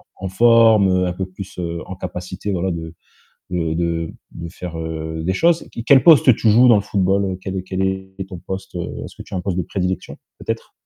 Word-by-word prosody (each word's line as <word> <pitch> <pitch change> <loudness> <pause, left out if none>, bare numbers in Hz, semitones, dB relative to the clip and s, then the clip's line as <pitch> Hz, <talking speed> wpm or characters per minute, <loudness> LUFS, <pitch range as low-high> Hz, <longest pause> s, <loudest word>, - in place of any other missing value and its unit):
en 95 - -5
forme, 115 -1 +5
heu, 90 0 +2
un 90 - -2
peu 95 +1 -4
plus, 95 0 -10
heu, 85 -1 -3
en 95 - -7
capacité, 90 +2 -5
voilà, 95 0 -1
de 80 0 -6 0.6
de 85 -3 -1
de 85 -1 -1 0.2
de 85 0 -7
faire, 90 0 -8
heu, 80 0 -5
des 95 +3 0
choses. 170 - +2
Q 115 - -6
quel 135 -1 +6
poste 145 -7 +7
tu 110 - +2
joues, 120 +4 +6
dans 120 - +7
le - - +1
football, 100 0 +1
heu, 95 -1 -3
quel 95 0 -4
est - - -2
quel 95 0 -3
est 95 0 -4
ton 90 -3 -8
poste, 95 +1 -7
heu, 85 - -5
est-ce - - -12
que - - -10
tu - - -13
as - - 0
un 90 - -2
poste 95 -2 -2
de - - +1
prédilection, 95 0 -3 0.2
peut-être? - - -5
95 Hz, 240 wpm, -20 LUFS, 85-100 Hz, 0.6 s, poste